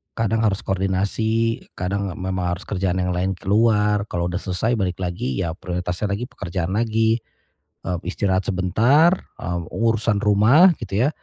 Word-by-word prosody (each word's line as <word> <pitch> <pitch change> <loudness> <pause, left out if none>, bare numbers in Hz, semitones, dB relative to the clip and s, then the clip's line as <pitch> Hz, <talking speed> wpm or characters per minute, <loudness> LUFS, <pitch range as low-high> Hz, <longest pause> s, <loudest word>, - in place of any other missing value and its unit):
Kadang 115 0 0
harus 100 -2 +1
koordinasi, 100 +4 0
kadang 100 +1 -2
memang 90 -1 -2
harus 95 - -11
kerjaan 95 -2 -1
yang 90 0 0
lain 95 +2 0
keluar. 105 +1 +2
Kalau 85 0 -2
udah 90 - -2
selesai 105 +6 -1
balik 90 -1 -2
lagi 85 -8 -3
ya 80 - -1
prioritasnya 90 +2 -3
lagi 120 +5 -2
pekerjaan 90 +2 -4
lagi. 110 0 +2 0.7
Eee, 90 -1 -1
istirahat 95 +1 -1
sebentar, 115 - +4 0.2
eee, 85 0 -3
urusan 115 -2 +1
rumah 110 - +5
gitu 110 +2 0
ya. - - +3
100 Hz, 150 wpm, -22 LUFS, 90-110 Hz, 0.7 s, rumah